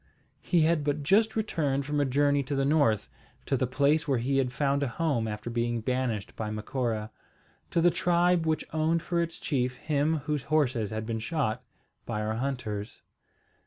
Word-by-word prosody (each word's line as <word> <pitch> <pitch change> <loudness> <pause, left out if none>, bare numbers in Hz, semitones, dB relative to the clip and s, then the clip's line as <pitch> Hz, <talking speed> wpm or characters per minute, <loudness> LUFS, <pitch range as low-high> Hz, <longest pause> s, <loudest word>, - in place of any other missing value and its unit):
He 175 -3 +2
had 160 -1 +3
but 145 0 -1
just 215 +8 +3
returned 145 -11 0
from 145 +1 -1
a 145 - +3
journey 145 +2 +2
to 140 +2 -2
the 135 0 +1
north, 140 -8 +2 0.4
to 135 - +1
the 130 -1 0
place 145 +5 +2
where 135 -3 +2
he 135 +4 +1
had 130 -2 0
found 140 +1 0
a 140 - +1
home 130 -4 0
after 105 +2 -5
being 120 0 0
banished 120 -3 -2
by 110 -1 -3
Macora, 110 0 -2 0.6
to 170 - +1
the 175 +1 +5
tribe 175 0 +2
which 155 -1 0
owned 160 +1 +1
for 170 0 0
its 165 0 -4
chief 125 -3 -1
him 150 +3 0
whose 150 -3 -2
horses 130 -8 +1
had 110 0 -4
been 115 0 -2
shot 125 -3 -1 0.4
by 110 -3 -2
our 110 +1 -1
hunters. 115 -4 -4
140 Hz, 185 wpm, -28 LUFS, 120-155 Hz, 0.6 s, the